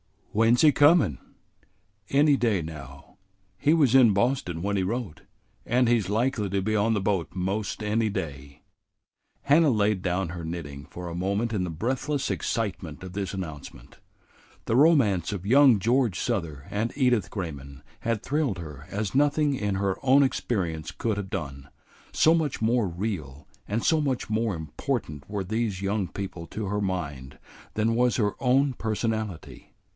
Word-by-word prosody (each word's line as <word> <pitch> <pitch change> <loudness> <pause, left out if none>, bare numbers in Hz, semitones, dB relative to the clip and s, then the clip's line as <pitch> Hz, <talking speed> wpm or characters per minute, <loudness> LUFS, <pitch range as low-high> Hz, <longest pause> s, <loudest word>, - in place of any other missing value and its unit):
"When 115 +2 +4
's - - +1
he 155 - +7
comin'?" 145 - +4 0.9
"Any 145 +1 +4
day 110 -8 +1
now. 70 -4 -10 0.4
He 150 +2 +3
was 145 -7 +3
in 125 -5 +7
Boston 100 -6 0
when 100 0 0
he - - +1
wrote, 100 -2 -4 0.4
and 125 0 +2
he's 115 -6 +2
likely 110 -1 0
to 100 -1 0
be 110 +3 -1
on 110 +2 +2
the 105 - 0
boat 95 -3 -1
'most 100 +4 -2
any 110 +1 +1
day." 70 -8 -6 0.8
Hannah 150 +2 +5
laid 105 -4 +1
down 90 -1 -1
her 85 -1 -6
knitting 75 -4 -6
for 90 0 -7
a 85 - -5
moment 100 +6 -1
in 95 -4 0
the - - -4
breathless 130 - -2
excitement 95 -8 -3
of 95 - -7
this 100 -1 -3
announcement. 80 -7 -8 0.7
The 115 - +1
romance 125 - +4
of 95 -2 -6
young 130 +1 +6
George 115 -1 +1
Souther 80 -9 -3
and 110 +3 -1
Edith 125 -6 +2
Grayman 70 -7 -7 0.2
had 115 -1 -2
thrilled 145 -8 0
her 75 -4 -9
as 100 -1 -3
nothing 145 +1 +2
in 105 -6 -1
her 95 -1 -1
own 135 +1 +5
experience 90 - -2
could 110 -3 -2
have 100 -2 -4
done, 70 -7 -5 0.5
so 160 - +5
much 160 -4 0
more 115 -1 +2
real 85 -7 -5 0.2
and 110 +3 -1
so 160 - +3
much 135 -6 -2
more 110 -2 0
important 80 - -4
were 100 -2 -2
these 105 -1 -2
young 100 -1 0
people 90 -4 -6
to 105 -2 -5
her 105 +2 -1
mind 75 -9 -4 0.4
than 110 +1 +1
was 125 -2 +2
her 105 -2 +1
own 135 +2 +3
personality. 110 -5 -3
105 Hz, 165 wpm, -26 LUFS, 90-120 Hz, 0.9 s, he